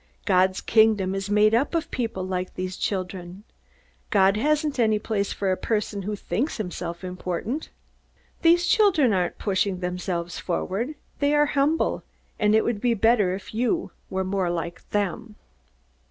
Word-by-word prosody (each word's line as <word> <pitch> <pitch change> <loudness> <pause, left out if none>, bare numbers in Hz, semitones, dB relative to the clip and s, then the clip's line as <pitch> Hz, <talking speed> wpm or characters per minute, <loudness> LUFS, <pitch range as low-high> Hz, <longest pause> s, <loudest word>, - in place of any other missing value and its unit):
God's 185 0 +3
Kingdom 215 -4 +3
is 195 0 -3
made 210 +1 +4
up 275 +8 +2
of 330 - -1
people 225 -6 -2
like 185 -1 -3
these 185 0 -4
children. 185 0 -4 0.7
God 195 -1 +4
hasn't 295 +4 0
any 220 -2 +3
place 210 -1 -2
for 195 -2 -1
a - - +2
person 210 -1 -2
who 210 +2 -3
thinks 255 +8 -2
himself 175 -4 -5
important. 185 - -4 0.7
These 345 +1 +5
children 355 - +4
aren't 180 -2 0
pushing 195 -2 0
themselves 180 -1 -3
forward. 205 - -2 0.2
They 285 +1 +2
are 295 0 +5
humble, 295 +3 +1 0.4
and 210 0 +3
it 220 - +4
would 225 -4 -1
be 240 -2 +2
better 210 -4 +3
if 195 - -10
you 235 +1 0 0.2
were 190 0 -1
more 190 -1 -1
like 170 0 -5
them!" 210 +2 -2
205 Hz, 155 wpm, -25 LUFS, 185-235 Hz, 0.7 s, These